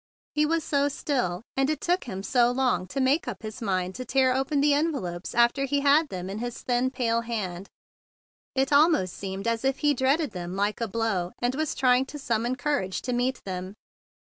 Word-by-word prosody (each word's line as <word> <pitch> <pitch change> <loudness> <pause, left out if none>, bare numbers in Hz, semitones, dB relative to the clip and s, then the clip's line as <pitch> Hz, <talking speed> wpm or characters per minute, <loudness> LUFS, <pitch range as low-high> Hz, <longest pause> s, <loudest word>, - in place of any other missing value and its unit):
He 300 0 +2
was 330 0 +1
so 285 -1 +1
still, 245 - -2
and 270 +1 +2
it 310 -2 -1
took 355 +4 0
him 195 -5 -5
so 240 +1 +3
long 245 -7 +1
to 275 - -4
make 270 +4 +2
up 220 -3 -6
his 215 +3 -7
mind 185 -3 -1
to 255 - -5
tear 260 +1 +2
open 270 +2 0
the 290 +1 +4
envelopes 275 - -2
after 240 +4 +3
he 285 +1 0
had 290 +2 +4
them 180 -1 -5
in 195 +2 -5
his 240 0 -5
thin 250 +1 +1
white 230 -2 +1
hand. 195 -5 -4 0.9
It 270 +2 +1
almost 285 - +4
seemed 195 +2 -5
as 230 0 0
if 270 0 +1
he 295 - +5
dreaded 280 +3 +1
them 180 0 -6
like 205 +3 -1
a 230 - 0
blow, 200 -5 -1
and 245 +1 0
was 310 +2 -2
trying 255 0 +3
to 295 - -7
summon 240 -2 -1
cour¬ 270 -3 0
age 190 - -5
to 250 - -2
meet 250 +1 0
them. 185 +1 -5
245 Hz, 210 wpm, -26 LUFS, 200-280 Hz, 0.9 s, he